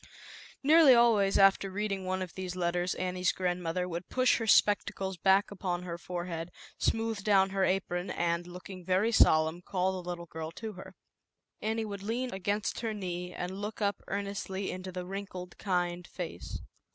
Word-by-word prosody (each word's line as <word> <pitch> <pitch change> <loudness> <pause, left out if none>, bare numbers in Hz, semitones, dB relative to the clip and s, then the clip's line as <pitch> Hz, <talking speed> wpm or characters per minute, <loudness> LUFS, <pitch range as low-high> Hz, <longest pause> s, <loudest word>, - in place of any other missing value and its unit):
Nearly 300 -2 +8
always 220 -5 +4
after 195 0 +5
reading 195 -1 -2
one 185 0 -1
of 180 - -8
these 185 -1 -5
letters, 175 0 0
Annie's 180 -1 0
grandmother 180 -1 -1
would 175 0 -5
push 255 -1 +3
her 225 - -3
spectacles 195 -2 +3
back 190 +4 +3
upon 180 -3 -3
her 170 -1 -5
fore 175 0 -4
head, 165 -1 -5 0.3
smooth 225 -2 0
down 195 -2 +4
her 195 -1 +1
apron 185 -1 -1
and, 170 0 -1
look 180 +1 -9
ing 185 -2 -9
very 190 +5 +2
solemn, 160 -5 +4
call 185 0 0
the 175 - -8
little 170 -1 -4
girl 160 -1 -6
to 220 +4 -6
her. 185 - -11 0.7
Annie 220 +1 -1
would 200 -2 -6
lean 240 +5 -2
against 200 +2 -1
her 225 -2 -2
knee 180 -2 -4
and 185 +3 -5
look 210 +1 -5
up 200 -2 0
earnestly 200 -1 -3
into 185 0 -6
the 180 0 -5
wrinkled, 185 -2 -7
kind 175 -2 -1
face. 170 - -6
190 Hz, 175 wpm, -31 LUFS, 180-205 Hz, 0.7 s, Nearly